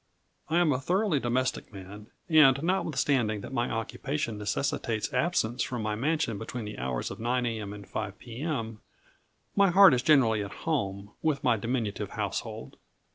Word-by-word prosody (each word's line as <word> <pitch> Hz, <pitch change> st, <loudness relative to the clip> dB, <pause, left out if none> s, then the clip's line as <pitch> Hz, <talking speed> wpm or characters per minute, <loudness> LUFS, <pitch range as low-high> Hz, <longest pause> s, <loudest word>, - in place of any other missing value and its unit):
I 165 Hz, -, +2 dB
am 175 Hz, -3 st, +4 dB
a 130 Hz, -, -1 dB
thoroughly 180 Hz, +2 st, +1 dB
domestic 125 Hz, 0 st, -1 dB
man, 100 Hz, +1 st, -10 dB, 0.2 s
and 150 Hz, -4 st, +6 dB
notwithstanding 135 Hz, -, +1 dB
that 135 Hz, -, -8 dB
my 120 Hz, -2 st, 0 dB
occupation 115 Hz, +1 st, -3 dB
necessitates 110 Hz, +2 st, -2 dB
absence 125 Hz, -4 st, 0 dB
from 120 Hz, -3 st, -2 dB
my 105 Hz, 0 st, -1 dB
mansion 130 Hz, -2 st, -1 dB
between 115 Hz, 0 st, -5 dB
the 105 Hz, -, -7 dB
hours 65 Hz, -1 st, -3 dB
of -, -, -8 dB
9 120 Hz, +2 st, 0 dB
a.m. 110 Hz, -4 st, -3 dB
and 100 Hz, -2 st, -9 dB
5 95 Hz, +1 st, -4 dB
p.m., 115 Hz, -2 st, -4 dB, 0.8 s
my 200 Hz, -1 st, +5 dB
heart 190 Hz, -2 st, +8 dB
is 125 Hz, -, +2 dB
generally 120 Hz, -8 st, +4 dB
at 100 Hz, -, -9 dB
home, 100 Hz, -10 st, -2 dB
with 150 Hz, -3 st, 0 dB
my -, -, +4 dB
diminutive 115 Hz, -1 st, -2 dB
household. -, -, -4 dB
120 Hz, 160 wpm, -28 LUFS, 105-150 Hz, 0.8 s, heart